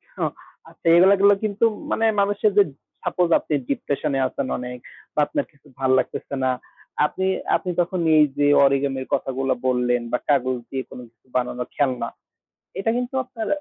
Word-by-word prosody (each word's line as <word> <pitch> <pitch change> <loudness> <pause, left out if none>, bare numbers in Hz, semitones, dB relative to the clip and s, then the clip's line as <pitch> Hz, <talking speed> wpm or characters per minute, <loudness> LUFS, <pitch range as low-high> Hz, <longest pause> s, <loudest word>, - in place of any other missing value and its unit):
হ্যাঁ - - -1 0.4
আচ্ছা, - - -24
এগুলা 190 +3 +7
গুলা 200 0 +6
কিন্তু 215 +1 +1 0.3
মানে 225 - +1 0.2
মানুষের 205 +1 +2
যে 205 - +8 0.4
সাপোস 175 -1 0
আপনি - - -5 0.2
ডিপ্রেশনে 140 0 -1
আছেন 130 +1 -4
অনেক 125 0 -6 0.4
বা - - -1
আপনার - - -2
কিছু 140 - -25
ভাল 130 -1 +1
লাগতেছে 140 - -4
না। 130 - +3 0.5
আপনি, 190 +5 -2 0.3
আপনি 180 - -2
তখন 175 +1 -2 0.2
এই 155 - +7
যে 145 - +3 0.2
অরিগ্যামির 135 -1 0
কথাগুলা 135 0 0
বললেন 125 -1 +1
বা 125 - +2
কাগজ 130 -3 +2
দিয়ে 135 -1 -3
কোন - - -10
কিছু 115 0 -39
বানানোর 125 0 -1
খেলনা, 130 -5 0 0.7
এটা 195 +4 0
কিন্তু 250 +1 -3
আপনার 240 -3 -6
140 Hz, 165 wpm, -23 LUFS, 130-195 Hz, 0.7 s, যে